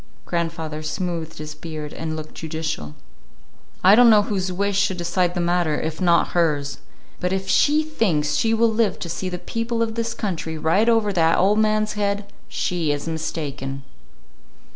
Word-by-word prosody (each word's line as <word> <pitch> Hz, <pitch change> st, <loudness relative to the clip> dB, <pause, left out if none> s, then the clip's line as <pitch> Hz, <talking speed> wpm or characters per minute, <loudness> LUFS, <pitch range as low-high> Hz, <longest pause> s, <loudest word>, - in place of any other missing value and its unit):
Grandfather 165 Hz, -2 st, -3 dB
smoothed 160 Hz, +1 st, -4 dB
his 155 Hz, 0 st, -6 dB
beard 155 Hz, -1 st, -7 dB
and 160 Hz, -1 st, -4 dB
looked 155 Hz, 0 st, -7 dB
judicial. 155 Hz, -, -4 dB, 0.9 s
"I 190 Hz, +2 st, +8 dB
don't 240 Hz, +2 st, +7 dB
know 210 Hz, -2 st, +6 dB
whose 190 Hz, -3 st, -2 dB
wish 200 Hz, +2 st, 0 dB
should 200 Hz, -2 st, +1 dB
decide 175 Hz, +1 st, 0 dB
the -, -, -1 dB
matter, 175 Hz, -3 st, +1 dB
if 160 Hz, +1 st, -4 dB
not 170 Hz, -2 st, +3 dB
hers. 150 Hz, -5 st, 0 dB, 0.4 s
But 180 Hz, -, -1 dB
if 190 Hz, 0 st, -2 dB
she 300 Hz, +2 st, +4 dB
thinks 175 Hz, -, 0 dB
she 225 Hz, -, +2 dB
will 225 Hz, 0 st, +3 dB
live 215 Hz, -4 st, +1 dB
to 170 Hz, -, -6 dB
see 185 Hz, +2 st, -3 dB
the 180 Hz, -, -4 dB
people 230 Hz, +4 st, -2 dB
of 225 Hz, -1 st, -3 dB
this 230 Hz, 0 st, -2 dB
country 165 Hz, -7 st, -3 dB
ride 180 Hz, +9 st, +2 dB
over 225 Hz, -3 st, +2 dB
that 165 Hz, -2 st, +3 dB
old 205 Hz, +3 st, +3 dB
man's 215 Hz, 0 st, +2 dB
head, 205 Hz, -1 st, -1 dB, 0.2 s
she 170 Hz, -4 st, -1 dB
is 145 Hz, +2 st, -3 dB
mistaken." 145 Hz, -4 st, -4 dB
175 Hz, 170 wpm, -22 LUFS, 160-210 Hz, 0.9 s, I